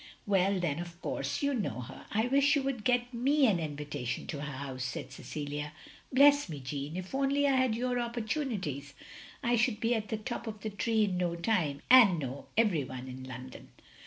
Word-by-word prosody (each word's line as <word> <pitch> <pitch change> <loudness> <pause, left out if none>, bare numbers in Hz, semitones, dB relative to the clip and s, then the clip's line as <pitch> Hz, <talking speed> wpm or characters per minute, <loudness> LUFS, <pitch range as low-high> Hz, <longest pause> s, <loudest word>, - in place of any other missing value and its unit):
"Well, 195 -1 +2
then 165 -4 -1
of 175 0 -7
course 285 - -3
you 285 0 +2
know 140 - -2
her. 120 - -10
I 220 +2 +2
wish 280 +3 +4
you 285 - +1
would 265 -5 -2
get 245 +1 +1
me 275 +4 +3
an 200 -8 +3
invitation 145 -5 -4
to 145 - -5
her 150 0 -4
house," 130 -1 -5
said 130 0 -5
Cecilia. 145 +2 -5 0.4
"Bless 285 -1 +6
me, 150 -3 -5
Jeanne, 140 +4 -5
if 185 +4 -6
only 275 +1 +2
I 280 - +4
had 255 -3 +2
your 245 +1 0
opportunities 225 - -3 0.5
I 240 0 +3
should 230 -1 +1
be 230 +2 +2
at 220 -2 -1
the 220 - -1
top 230 +2 -5
of 215 -2 -6
the 215 - -4
tree 220 +2 +1
in 190 -3 0
no 175 -1 0
time, 170 -7 0
and 235 -8 +8
know 135 -2 -5
every 205 -10 +3
one 130 0 -7
in 130 0 -8
London." 130 0 -9
200 Hz, 200 wpm, -31 LUFS, -, 0.5 s, and